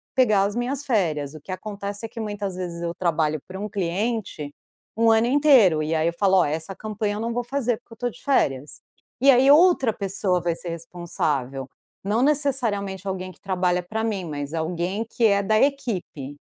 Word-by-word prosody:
pegar 215 -7 +4
as 205 +2 -1
minhas 260 +4 -2
férias, 160 - 0
o 155 - -9
que 185 - -10
acontece 200 +2 -5
é - - -7
que 230 - -9
muitas 205 -3 -4
vezes 175 -2 -5
eu 170 0 -2
trabalho 160 -4 0
para 190 +1 -8
um 210 +2 -4
cliente, 195 -4 -2 0.5
um 230 0 +4
ano 225 +1 +4
inteiro, 255 - +5
e 155 +1 -1
aí 160 +1 +1
eu 170 - 0
falo: 190 -2 +4
"Ó, - - +4
essa 160 +5 -3
campanha 210 0 -3
eu - - -4
não 230 +1 -2
vou 245 0 -1
fazer, 245 -3 -1
porque 240 -2 -17
eu - - -12
estou 245 +2 -2
de - - -13
férias". 145 - 0 0.4
E 275 0 +7
aí 260 +2 +5
outra 295 - +5
pessoa 195 -3 -1
vai 170 0 0
ser 175 - -6
responsável, 150 -6 -3 0.3
não 210 +5 +1
necessariamente 235 - 0
alguém 185 -1 -4
que - - -20
trabalha 180 -2 0
pra 220 +5 -3
mim 205 -5 -2
mas 145 -2 -5
alguém 175 +6 -2
que 235 - +1
é 200 -2 +4
da 215 +2 +2
equipe. 195 - -1
200 Hz, 200 wpm, -24 LUFS, 170-230 Hz, 0.5 s, E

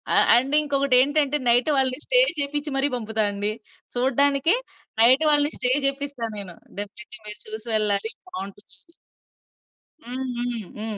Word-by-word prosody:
అ - - +5 0.2
and 260 +4 +3
ఇంకొకటేంటంటే, 280 0 +1
night 245 +5 +2
వాళ్ళని 260 0 0
stay - - +3 0.2
చేపిచ్చి 290 +1 -2
మరి 270 +1 +2
పంపుతా 220 -2 -3
అండి. 205 +1 -3 0.4
చూడడానికే 275 - +3 0.5
నైట్ 255 +6 +4
వాళ్ళని 290 0 +3
స్టే 250 -1 +2
జేపిస్తా 275 -3 -2
నేను. 190 -4 -6 0.2
డెఫినిట్లీ 240 +5 -8
మీరు 210 0 -2
చూసి 220 +1 -7
వెళ్ళాలి 210 0 +3 0.2
బావుంటుందని. 210 - -9 1.1
హ్మ్. 255 +2 -6
హ్మ్. 240 0 -4 0.2
హ్మ్. 215 0 -6
255 Hz, 130 wpm, -22 LUFS, 220-285 Hz, 1.1 s, అ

